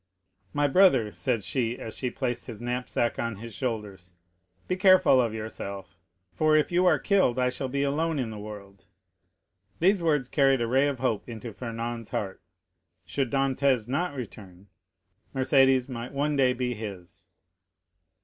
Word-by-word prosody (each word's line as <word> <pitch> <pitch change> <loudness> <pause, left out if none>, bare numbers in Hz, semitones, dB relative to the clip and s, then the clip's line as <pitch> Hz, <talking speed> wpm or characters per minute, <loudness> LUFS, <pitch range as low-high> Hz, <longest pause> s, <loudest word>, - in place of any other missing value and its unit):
"My 145 -1 +1
brother," 140 - +4
said 115 -1 -2
she, 120 +1 -1
as 110 - -7
she 125 - -2
placed 125 -1 -3
his 115 -4 -7
knapsack 120 0 -2
on 115 -2 -2
his 115 +3 -9
shoulders, 105 -8 -5 0.5
"be 185 - 0
careful 185 -8 +5
of 115 -3 0
yourself, 100 -5 -7 0.4
for 155 +5 +3
if 155 - +1
you 180 +1 +3
are - - +5
killed, 190 -12 +2
I 125 0 +2
shall 130 +1 -3
be 140 +2 -1
alone 155 +3 0
in 125 -5 -2
the 105 - -7
world." 100 -2 -10 0.9
These 190 +2 +3
words 150 -6 +1
carried 135 -1 +3
a - - +1
ray 135 +4 +3
of 140 -2 -2
hope 120 -3 -1
into 115 -1 -7
Fernand's 115 +1 -5
heart. 95 -2 -4 0.6
Should 135 -3 -1
Dantès 135 -3 +1
not 145 +5 -1
return, 100 -6 -9 0.7
Mercédès 130 -1 +4
might 125 0 -6
one 145 +2 0
day 130 -2 +3
be 125 0 -2
his. 100 -6 -9
125 Hz, 160 wpm, -27 LUFS, 110-140 Hz, 0.9 s, careful